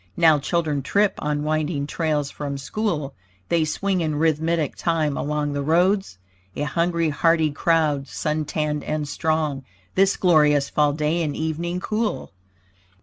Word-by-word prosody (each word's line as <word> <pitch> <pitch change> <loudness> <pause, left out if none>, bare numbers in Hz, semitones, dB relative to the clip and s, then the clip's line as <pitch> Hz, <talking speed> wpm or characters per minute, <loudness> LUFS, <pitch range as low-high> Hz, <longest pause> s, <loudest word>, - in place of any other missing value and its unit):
Now 160 -3 +5
children 150 -1 -1
trip 200 +9 +2
on 150 0 -1
winding 155 -1 -1
trails 150 -2 -1
from 140 -1 -5
school; 150 -1 -2 0.4
They 170 -2 +3
swing 185 +4 -1
in 155 -2 -1
rhythmic 160 0 0
time 160 -4 0
along 150 0 -2
the 145 - -2
roads; 175 - +1 0.4
A - - -2
hungry, 170 +2 0
hearty 160 +1 +2
crowd, 150 -2 +1
suntanned 150 -1 -2
and 155 -1 -2
strong. 155 -3 -1 0.3
This 195 +1 +3
glorious 150 -5 +3
fall 150 -1 +2
day 155 +3 0
in 150 -3 -2
evening 170 +3 -2
cool. 215 +1 -2
155 Hz, 140 wpm, -23 LUFS, 150-170 Hz, 0.4 s, Now